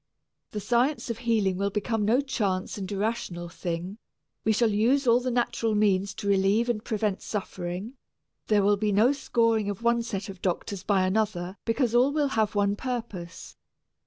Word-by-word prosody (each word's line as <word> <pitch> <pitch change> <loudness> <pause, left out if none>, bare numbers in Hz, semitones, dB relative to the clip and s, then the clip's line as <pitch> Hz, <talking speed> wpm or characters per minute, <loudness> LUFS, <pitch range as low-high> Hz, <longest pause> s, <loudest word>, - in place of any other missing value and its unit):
The 210 - -4
science 240 +5 +1
of 230 - -6
healing 220 -6 +1
will 200 +1 0
become 210 +1 -1
no 240 +6 +3
chance 200 -9 -2
and 195 -2 -5
irrational 195 -4 -2
thing. 175 +4 -5 0.4
We 220 - +2
shall 225 +1 +2
use 245 +7 +2
all 235 0 +5
the 255 0 -2
natural 235 -2 0
means 195 -2 +2
to 205 - -5
relieve 200 +4 +3
and 220 -3 -1
prevent 210 -3 -1
suffering 190 +1 -5 0.5
there 210 -2 +3
will 205 +1 +4
be 210 +1 0
no 215 +6 +4
scoring 230 -6 +1
of 205 +3 -5
one 235 0 +3
set 200 -4 -4
of 190 -3 -9
doctors 190 +1 -2
by 190 -1 +2
another 190 -2 -1
because 235 0 +1
all 250 +3 +4
will 295 -1 +1
have 220 -4 0
one 200 0 +2
purpose. 225 -8 -6
210 Hz, 175 wpm, -27 LUFS, 195-235 Hz, 0.5 s, all